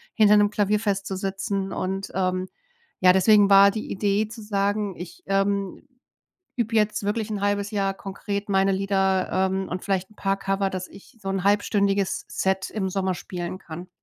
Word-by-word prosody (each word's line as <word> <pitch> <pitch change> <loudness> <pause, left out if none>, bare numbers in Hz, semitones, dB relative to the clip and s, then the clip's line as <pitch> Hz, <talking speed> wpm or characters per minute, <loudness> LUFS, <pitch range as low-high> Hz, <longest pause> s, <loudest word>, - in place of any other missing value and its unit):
hinter 210 -2 +6
'nem 205 0 +4
Klavier 210 0 +1
festzusitzen 195 -1 -2
und, 190 +1 -3
ähm, 185 0 0 0.5
ja 180 -1 +7
deswegen 200 +2 +5
war 200 0 +8
die 215 +1 -5
Idee 205 +2 0
zu 225 +1 -10
sagen: 205 -1 -1
„Ich, 175 - -9
ähm, 195 -1 0 0.8
übe 230 -1 -1
jetzt 210 -1 +1
wirklich 215 +1 -2
1/2 205 0 -1
Jahr 195 -2 0
konkret 200 +1 -5
meine 195 0 +3
Lieder, 190 -1 +1 0.2
ähm, 190 0 -2
und 180 - -5
vielleicht 190 -1 -1
'n 215 - -21
paar 195 0 -1
Cover, 195 0 -1
dass 185 -1 -5
ich 215 +5 -16
so 195 - -6
'n 195 -1 -2
halbstündiges 200 -1 +1
Set 190 0 -1
im 195 -3 -2
Sommer 190 0 -1
spielen 175 0 -6
kann.“ 175 +1 -9
195 Hz, 165 wpm, -24 LUFS, 190-205 Hz, 0.8 s, war